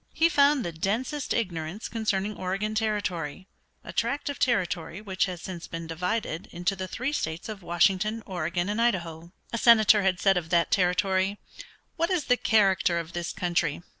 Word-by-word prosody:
He 330 +1 +4
found 285 -3 +4
the 170 - -2
densest 225 - -2
ignorance 175 -2 -2
concerning 210 -2 -1
Oregon 195 +4 -2
Territory, 200 -7 -2 0.4
a - - -9
tract 285 +1 -1
of 285 - -5
territory 185 -7 0
which 195 -3 -1
has 180 -3 -6
since 175 -3 -6
been 165 -1 -6
divided 180 +2 -3
into 175 +3 -1
the 185 -1 -5
three 255 +9 -3
states 160 - -3
of 215 -3 -7
Washington, 195 +6 +1
Oregon, 175 -1 -2
and 210 +3 -1
Idaho. 170 -7 -1 0.2
A 230 - 0
senator 220 -3 +6
had 190 -2 +1
said 195 -1 +4
of 165 -2 -3
that 170 -1 +2
territory, 190 +1 +2 0.6
"What 335 +1 +1
is 360 -5 +1
the 250 - +4
character 195 -7 +3
of 170 0 -5
this 175 0 -3
country? 175 -3 -1
190 Hz, 170 wpm, -27 LUFS, 175-220 Hz, 0.6 s, senator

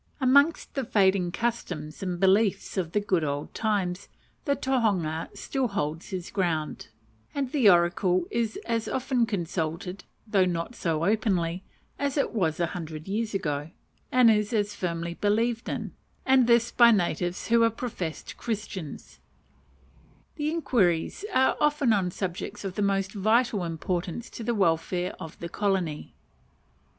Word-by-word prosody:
Amongst 280 +4 +3
the 270 - -1
fading 190 -5 +2
customs 175 -10 -3
and 180 -2 -3
beliefs 195 +2 +2
of 180 -4 -1
the 210 - +3
good 185 -5 0
old 145 0 -3
times 195 -5 -1 0.4
the 280 - +2
tohunga 200 - 0
still 265 -2 -1
holds 165 -6 -3
his 185 -2 -5
ground, 170 -6 -1 0.5
and 275 -3 -1
the 260 -8 +5
oracle 180 0 +3
is 230 -2 -1
as 230 -1 -1
often 255 -2 0
consulted 180 -1 -3 0.2
(though 200 -4 +3
not 175 +5 -2
so 165 -7 -1
openly) 185 -5 +1 0.4
as 285 0 -1
it 280 - +1
was 170 -8 0
a 170 - +3
hundred 160 -3 -6
years 215 +1 -2
ago, 150 -4 -2 0.4
and 250 -3 +6
is 210 +1 +1
as 205 -1 +1
firmly 170 -2 -3
believed 225 +5 0
in; - - -4 0.3
and 260 -2 +5
this 235 0 +4
by 235 -1 +7
natives 175 -4 0
who 235 0 +5
are 230 - +5
professed 210 -8 -5
Christians: 205 -8 -5 1.2
the 300 -1 -1
inquiries 240 - +1
are 265 -5 +3
often 295 -5 +3
on 190 -4 +1
subjects 190 +3 -5
of 190 - -3
the 205 - -3
most 195 -1 +1
vital 215 0 +2
importance 175 +5 -3
to 230 - -7
the 235 +1 0
welfare 180 -1 +1
of 160 - -8
the 170 - -5
colony. 185 -5 -2
195 Hz, 145 wpm, -27 LUFS, 175-230 Hz, 1.2 s, by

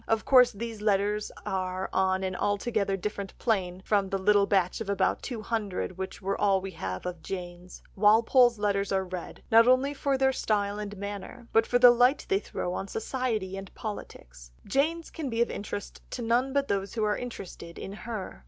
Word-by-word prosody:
Of 225 -1 +1
course 250 -2 +6
these 225 0 -6
letters 210 0 +1
are 185 0 -2
on 190 0 +2
an 185 -1 -2
altogether 205 0 0
different 200 0 -5
plane 190 -5 -1
from 200 -2 +2
the 195 - 0
little 200 +1 +4
batch 190 0 +1
of 210 - -4
about 200 -1 +1
two 235 -5 -5
hundred, 205 -4 -2
which 190 +1 -6
are 195 +1 0
all 195 -1 +3
we 190 0 -6
have 95 - -5
of 180 -2 -5
Jane's. 180 -1 -7
Walpole's 225 +4 +5
letters 200 -1 0
are 190 -1 +1
read, 180 -1 -7
not 230 +1 +7
only 260 +3 +4
for 275 -1 0
their 265 0 +3
style 205 -4 0
and 205 -1 -6
manner, 205 +4 -7
but 225 0 +4
for 245 - +3
the 245 0 +9
light 245 +4 +3
they 195 - +3
throw 180 -3 -4
on 195 - -4
society 220 -4 -2
and 195 -1 -8
politics. - - -8 0.2
Jane's 315 +9 0
can 305 -4 -4
be 230 -1 -3
of 235 - +2
interest 205 0 -6
to 245 - -5
none 240 +4 +2
but 280 0 +1
those 200 +2 -2
who 220 - 0
are 210 0 +2
interested 185 -8 -8
in 195 - -6
her. 215 - -6
205 Hz, 195 wpm, -28 LUFS, 190-235 Hz, 0.2 s, the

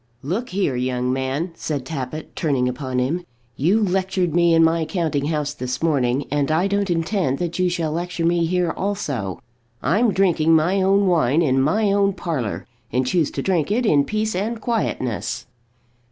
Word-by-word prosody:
"Look 195 - -2
here, 185 -8 0
young 125 0 -1
man," 135 +6 -2
said 145 -5 -4
Tappitt, 150 +1 -6
turning 135 -6 +1
upon 130 0 -3
him. 145 +8 0 0.3
"You 190 +10 +2
lectured 185 -3 0
me 170 -1 +4
in 165 - +5
my 165 0 +3
counting 160 -5 -1
house 150 -1 -1
this 125 0 -4
morning, 135 -4 +1
and 145 0 +1
I 160 +4 +2
don't 200 0 0
intend 165 -4 0
that 175 +2 -3
you 180 0 +3
shall 165 -3 -1
lecture 170 +1 -2
me 170 0 +2
here 180 -1 +1
also. 145 - -3 0.4
I'm 210 - +3
drinking 170 -4 +3
my 175 +5 +2
own 195 +1 +3
wine 165 -4 +3
in 135 -3 +2
my 200 +9 +2
own 200 0 +2
parlour, 155 - -3 0.3
and 130 +1 +1
choose 155 +3 +1
to - - -4
drink 180 -5 +1
it 235 +4 +1
in 145 -9 +4
peace 215 +5 -1
and 220 +5 -2
quietness." 130 - -2
165 Hz, 175 wpm, -22 LUFS, 140-190 Hz, 0.4 s, in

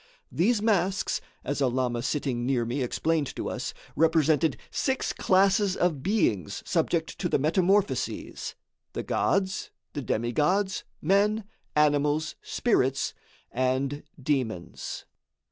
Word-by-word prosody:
These 210 +5 +2
masks, 195 -3 +1 0.2
as 145 +1 -2
a 135 - +4
lama 125 -1 0
sitting 135 -2 -1
near 125 -2 +1
me 125 +4 -2
explained 150 +3 0
to - - -3
us, - - -3 0.2
represented 160 0 +3
six 265 -1 0
classes 195 +1 +3
of 165 -6 +1
beings 135 - 0
subject - - 0
to - - 0
the - - +3
metamorphoses; 185 +7 0 0.4
the - - -3
gods, 190 -1 0 0.2
the 145 - -3
demigods, 150 - +1 0.2
men, 205 +5 +3 0.3
animals, 150 +1 +2
spirits 135 - +1 0.4
and 130 +3 0 0.2
demons. 125 - -2
150 Hz, 110 wpm, -27 LUFS, 130-190 Hz, 0.4 s, a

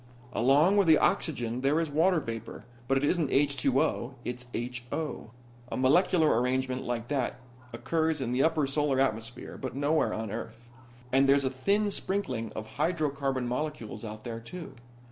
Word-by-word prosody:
"Along 145 - +4
with 200 -3 +4
the 160 -1 +7
oxygen 120 -5 0
there 140 +4 +2
is 165 -3 -1
water 165 +4 +3
vapor, 115 -5 -7 0.2
but 135 - +3
it 135 - +1
isn't 160 -2 +1
H2O. 135 -2 +1
It's 125 0 -5 0.4
HO. 155 -7 -4 0.4
A - - -2
molecular 155 0 +4
arrangement 130 0 0
like 120 -1 -3
that 135 -3 -1 0.3
occurs 160 +6 0
in 125 -3 -2
the 125 +2 +2
upper 160 -2 +3
Solar 140 -1 +1
atmosphere, 120 -2 -2
but 130 -1 -4
nowhere 145 +3 +2
on 110 -2 -4
Earth. 115 +1 -7 0.4
And 135 +1 +4
there's 140 0 +4
a 130 - 0
thin 200 +11 +1
sprinkling 190 - -2
of 110 0 -8
hydrocarbon 140 -6 0
molecules 125 -2 -4
out 110 -1 -7
there 115 -2 -5
too. 160 +6 -9
135 Hz, 160 wpm, -29 LUFS, 120-155 Hz, 0.4 s, the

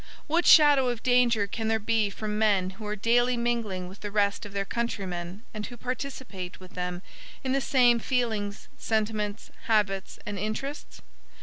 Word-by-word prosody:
What 335 +3 +1
shadow 290 -5 +7
of 240 -2 -4
danger 245 -4 +4
can 220 +3 -4
there 220 0 +2
be 220 -1 +1
from 210 +1 -4
men 200 -4 +2
who 210 +2 -9
are 210 - -2
daily 240 +3 +2
mingling 230 -6 -1
with 190 +2 -12
the 205 - -5
rest 205 +1 0
of - - -13
their 200 0 -2
countrymen 195 -4 -4
and 210 -1 -4
who 245 - -10
participate 250 -7 -5
with 185 0 -13
them 180 0 -4 0.4
in 260 - -1
the 275 +1 +2
same 245 -2 +4
feelings, 220 -5 -2
sentiments, 215 -2 -2 0.2
habits 205 -4 +1
and 205 -3 -4
interests? 215 +8 -5
215 Hz, 170 wpm, -27 LUFS, 200-240 Hz, 0.4 s, shadow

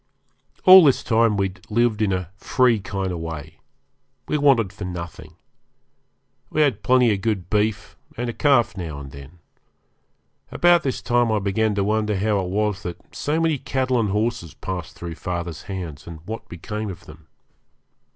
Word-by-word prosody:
All 185 0 +11
this 140 -4 +3
time 115 -2 +2
we 100 -1 +1
had 95 0 -18
lived 115 0 +1
in 105 -2 +2
a 90 -2 -3
free 120 +3 +2
kind 95 -1 -3
of 85 - -4
way 80 -1 -7 0.7
we - - -1
wanted 135 -9 +3
for 100 - -8
nothing. 85 -3 -7 1.1
We 155 - 0
had 125 -8 0
plenty 125 -3 +4
of 95 - -3
good 95 -5 -2
beef, 105 0 0 0.2
and 120 +1 -2
a 120 - -3
calf 120 -10 +3
now 80 -6 -5
and 70 -1 -9
then. 70 +5 -12 1.1
About 175 -1 +4
this 135 -5 -3
time 120 -2 +2
I 110 - +2
began 105 +2 0
to 100 - +1
wonder 105 +1 0
how 105 +1 +1
it 90 - -4
was 105 0 -1
that 90 +4 -8
so 145 +5 -1
many 160 -4 +1
cattle 130 -2 0
and 110 -3 0
horses 105 -6 -2
passed 90 -3 -6
through 85 -1 -6
father's 85 -1 -5
hands, 85 -7 -6
and 80 -2 -9
what 110 +3 -7
became 105 +4 -5
of 90 - -9
them. 80 +1 -15
105 Hz, 175 wpm, -22 LUFS, 90-120 Hz, 1.1 s, All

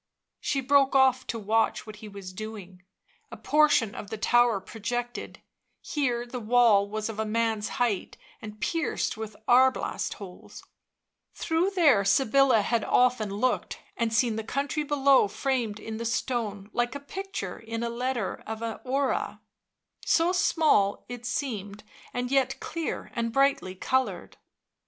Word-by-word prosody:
She 275 - -1
broke 275 +1 +3
off 260 -1 +4
to 230 - -3
watch 220 +1 0
what 215 -1 -10
he 215 - -10
was 200 -2 -9
doing. 195 -3 -8 0.5
A - - -9
portion 295 -8 +3
of 205 - -8
the 220 - -5
tower 240 -1 +3
projected; 240 +4 -5 0.4
here 245 -5 -1
the 245 +1 -6
wall 220 -3 +4
was 215 0 -3
of 220 -1 -6
a - - +1
man's 220 -1 0
height, 230 -6 -1 0.2
and 210 -1 -9
pierced 330 -1 -1
with 220 -1 -7
arblast 260 +1 +3
holes; 190 -4 -11 0.7
through 330 +3 +1
there 290 - +5
Sybilla 265 +2 +4
had 230 +1 0
often 250 -4 +2
looked 225 +6 -1 0.2
and 230 -1 -1
seen 225 0 +2
the 220 - -3
country 280 +6 -2
below 280 -5 +4
framed 230 -1 -2
in 220 0 -6
the 230 - -4
stone 220 -4 -2
like 240 +2 0
a - - -4
picture 385 +7 -6
in 230 0 -5
a 235 - -1
letter 240 -3 -2
of 220 +1 -5
an 225 -2 -4
horae, 270 +1 -1 0.7
so 335 +1 +3
small 310 - +2
it 245 -1 -6
seemed, 210 -6 -4 0.3
and 245 +1 -3
yet 270 -1 +1
clear 330 -1 -4
and 230 -1 -2
brightly 270 -8 +1
coloured. 260 +7 -1
235 Hz, 150 wpm, -27 LUFS, 215-265 Hz, 0.7 s, there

